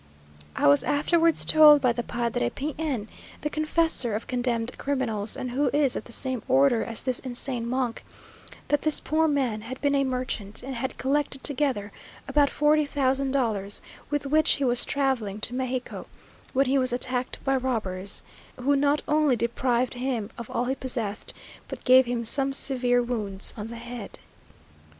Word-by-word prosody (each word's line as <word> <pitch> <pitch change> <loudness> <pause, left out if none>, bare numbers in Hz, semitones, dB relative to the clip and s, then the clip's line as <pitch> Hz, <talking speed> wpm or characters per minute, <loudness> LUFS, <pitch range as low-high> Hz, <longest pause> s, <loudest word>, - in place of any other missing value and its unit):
I - - +2
was 145 0 +6
afterwards 330 +3 +2
told 305 -1 +7
by 250 -3 +2
the 240 - -3
Padre 235 - -2
P 290 - -5
n, 265 -10 -2 0.3
the 300 - -3
confessor 310 -7 0
of 220 - -4
condemned 245 -1 -2
criminals, 230 -7 -2
and 255 - -4
who 280 +4 +1
is 285 -3 +2
of - - -5
the - - -10
same 255 0 +1
order 265 -3 +3
as 230 -1 -4
this 255 -2 +2
insane 245 -2 -2
monk, 250 -2 -2 0.7
that 290 - +2
this 310 -1 +2
poor 320 +1 +1
man 260 -8 -1
had 255 +4 -8
been 285 0 +1
a 275 -1 +2
merchant, 250 -6 -4
and 265 +1 -5
had 260 +2 -4
collected 275 0 -1
together 265 -8 0 0.4
about 290 -1 +3
forty 300 +1 +2
thousand 275 -1 0
dollars, 220 -7 -1 0.3
with 290 -1 -2
which 310 +3 +3
he 285 - -2
was 245 -2 +3
travelling 255 -8 -1
to 240 - -2
Mexico, 255 0 -4 0.4
when 270 +1 +2
he 270 +1 +2
was 255 -1 +5
attacked 250 +1 -2
by 270 -1 +1
robbers, 215 -7 +1 0.4
who 280 +3 +2
not 285 +1 +1
only 300 -3 +3
deprived 240 +1 0
him 245 -4 -3
of 235 - -9
all 245 - -1
he 260 - 0
possessed, 240 -6 -3 0.4
but - - -8
gave 255 0 +6
him 240 -1 -2
some 270 +4 +2
severe 250 -3 +2
wounds 210 -5 -2
on 210 -1 -6
the 235 - -8
head. 235 -2 -8
255 Hz, 175 wpm, -26 LUFS, 235-280 Hz, 0.7 s, told